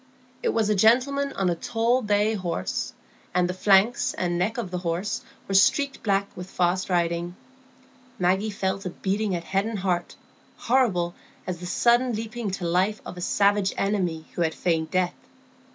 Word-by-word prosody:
It - - +1
was 225 -2 +1
a 210 - +3
gentleman 260 +7 +3
on 195 - 0
a - - 0
tall 235 +7 +1
bay 210 0 +2
horse; 180 -5 -3 0.4
and 180 -1 +3
the 180 - -2
flanks 195 +5 +3
and 175 -1 -1
neck 185 +7 0
of 215 -7 -4
the 180 - -2
horse 175 +4 -2 0.3
were 195 - -3
streaked 270 +8 +3
black 200 -2 +1
with 180 +1 -8
fast 180 +1 0
riding. 170 0 0 0.8
Maggie 190 +4 +1
felt 195 -1 -2
a 180 - -3
beating 195 +2 -1
at 170 - -4
head 195 +4 0
and 225 -2 -3
heart, 180 -2 -1 0.4
horrible 205 -9 +1 0.3
as 180 -2 -4
the 180 - -6
sudden 240 +4 +3
leaping 225 0 -4
to 190 -2 -4
life 185 +5 +1
of - - -7
a 180 - -8
savage 200 +1 +2
enemy 180 -6 -1
who - - -3
had 160 -1 +1
feigned 165 -3 0
death. 185 -1 +1
195 Hz, 175 wpm, -25 LUFS, 180-215 Hz, 0.8 s, a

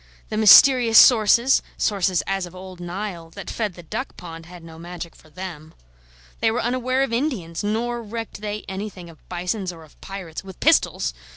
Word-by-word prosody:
The - - -4
mysterious 230 +1 +7
sources 235 +2 +6 0.2
sources 190 -3 +1
as 195 -2 -2
of 175 - -14
old 185 -1 -10
Nile 175 -1 -6
that - - -7
fed 210 -6 -3
the 175 - -11
duck 220 - -6
pond 165 -2 -10
had 175 -1 -12
no 165 -1 -12
magic 170 0 -8
for 155 - -20
them. 165 -2 -9 0.6
They 225 - +2
were 230 +2 -1
unaware 255 +2 0
of 270 - -3
Indians, 225 - -2
nor 235 +3 -2
recked 225 -1 -7
they 210 0 -5
anything 190 -3 -7
of 160 - -19
bisons 180 +2 -3
or 165 -2 -13
of 155 - -21
pirates 190 -5 -7
(with 190 -2 -12
pistols!) - - +2
195 Hz, 180 wpm, -22 LUFS, 175-225 Hz, 0.6 s, mysterious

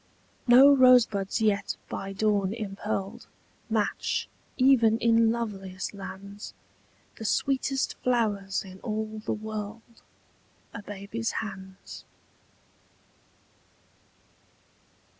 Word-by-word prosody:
No 265 +4 +8
rosebuds 240 -7 +4
yet 210 -2 +1
by 195 0 -5
dawn 200 0 0
impearled 200 -2 -4 0.4
Match, 215 -2 -1 0.3
even 250 -4 +5
in 230 -1 +4
loveliest 195 -6 -4
lands, 200 +1 -9 0.6
The - - -6
sweetest 270 +4 0
flowers 210 -6 0
in 190 -1 -12
all 215 -1 -4
the - - -2
world— 215 +2 -7 0.7
A 205 - -6
baby's 205 +3 -4
hands. 190 -3 -7
215 Hz, 85 wpm, -27 LUFS, 200-230 Hz, 0.7 s, No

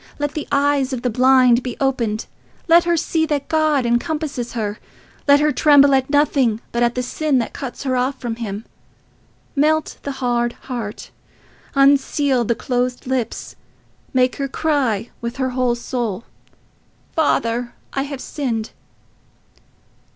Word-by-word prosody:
Let 290 0 -2
the 305 - -4
eyes 280 -1 +2
of 245 -1 -4
the 250 - 0
blind 255 0 +5
be 250 -1 -5
opened. 235 -6 0 0.4
Let 340 +1 +6
her 345 -1 +2
see 320 0 0
that 290 -3 -1
God 310 -4 +2
encompasses 265 +1 -1
her. 210 -3 -3 0.5
Let 285 0 +7
her 300 0 +3
tremble 285 0 +5
at 265 0 +2
nothing 275 -6 +2
but 235 - -1
at 240 0 +2
the 250 - -1
sin 295 +2 0
that 235 - -2
cuts 265 -1 -6
her 260 -2 0
off 260 +2 -1
from 230 -2 -4
him. 215 -2 -5 0.9
Melt 310 +2 +1
the 280 - -4
hard 240 -2 0
heart. 235 -5 -7 0.6
Unseal 275 -1 +3
the 235 - +1
closed 250 -1 -2
lips: 255 -3 -3 0.6
make 255 -1 +2
her 275 - -2
cry 265 -7 0
with 235 0 -4
her 260 -1 -1
whole 250 -1 +1
soul, 235 -4 -3 0.9
'Father, 240 -6 0 0.2
I 270 - 0
have 275 -1 -5
sinned. 230 -7 -3
260 Hz, 145 wpm, -20 LUFS, 240-285 Hz, 0.9 s, Let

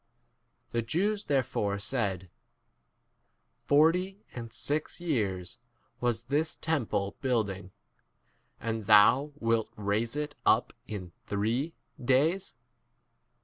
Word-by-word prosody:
The 120 - +1
Jews 200 - 0
there 135 -2 +2
fore 100 -3 -1
said, 100 -5 -2 1.4
Forty 180 +7 +3
and 115 -2 -6
six 150 +8 -2
years 105 - -2 0.4
was 120 -2 0
this 145 +6 0
temple 110 -11 -1
k - - -30
building, 100 -7 -1 0.9
and 110 -3 -3
thou* 125 +8 +6
wilt 115 -1 +1
raise 105 +4 0
it 150 0 -2
up - - +4
in 95 -5 -6 0.2
three 115 +10 -1 0.3
days 150 +9 +2
120 Hz, 105 wpm, -30 LUFS, 105-150 Hz, 1.4 s, thou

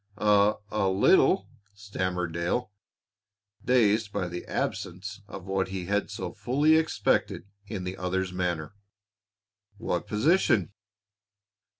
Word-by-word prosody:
"A 105 0 +4 0.2
a 100 -3 +1
little," 95 +1 +4 0.3
stammered 90 -4 -3
Dale, 85 +8 -1 0.9
dazed 110 -4 +3
by 100 -3 -2
the 85 0 -6
absence 100 +3 -4
of 95 -3 -9
what 95 -1 -1
he 95 -1 -5
had 100 +2 0
so - - -5
fully 145 +5 +2
expected 160 - +1 0.2
in 100 -4 -5
the 90 +1 -5
other's 90 0 -2
manner. 85 -2 -2 1.0
"What 95 -5 -2
position?" 110 - +2
100 Hz, 110 wpm, -27 LUFS, 90-105 Hz, 1.0 s, A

